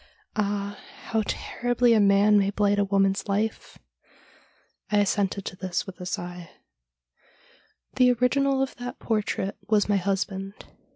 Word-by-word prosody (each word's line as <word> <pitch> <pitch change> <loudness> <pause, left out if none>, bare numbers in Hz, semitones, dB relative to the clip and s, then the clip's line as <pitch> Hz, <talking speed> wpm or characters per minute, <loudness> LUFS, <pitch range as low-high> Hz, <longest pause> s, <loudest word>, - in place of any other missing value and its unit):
Ah, 205 -1 -2 0.3
how 225 -1 +1
terribly 245 0 +1
a 220 - +4
man 200 +1 +5
may 195 0 +1
blight 205 0 +1
a - - +4
woman's 195 0 +1
life! 210 +2 -2 0.6
' - - -33
I 210 - +3
assented 200 -1 0
to - - -5
this 185 -1 -3
with 190 -1 -10
a 180 - -5
sigh. 175 -1 -5 0.8
' - - -33
The 250 -1 +5
original 270 +2 +2
of 270 - -5
that 245 +1 -6
portrait 210 -3 -2
was 210 -2 +3
my 205 -1 +2
husband. 195 +1 -2
205 Hz, 150 wpm, -26 LUFS, 195-225 Hz, 0.8 s, man